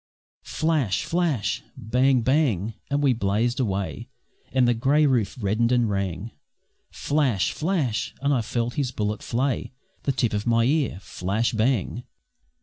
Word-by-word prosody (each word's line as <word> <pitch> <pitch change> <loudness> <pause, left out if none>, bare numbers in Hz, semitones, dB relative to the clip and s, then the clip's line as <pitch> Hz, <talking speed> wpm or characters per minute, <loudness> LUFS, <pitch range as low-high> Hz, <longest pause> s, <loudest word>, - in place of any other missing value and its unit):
Flash! 155 - 0
flash! 165 - 0 0.2
bang! 125 +3 +2
bang! 115 - +1 0.2
and 145 +1 0
we 135 -3 +4
blazed 115 +4 0
away, 95 - -2 0.4
And 130 -2 +3
the 120 - +4
grey 140 +6 +3
roof 125 -7 +1
reddened 110 +3 +1
and 120 -2 +3
rang; 95 +2 -3 0.6
Flash! 140 -10 0
flash! 155 - -1
and 140 +1 +1
I 125 - +2
felt 120 +2 -2
his 140 -4 -1
bullet 105 -2 -2
flay 130 +2 -1 0.3
The 140 - 0
tip 125 -4 0
of 105 +2 -2
my 115 0 +3
ear. 135 - +1
Flash! 100 +7 -1
bang! 115 0 0
120 Hz, 145 wpm, -25 LUFS, 105-135 Hz, 0.6 s, we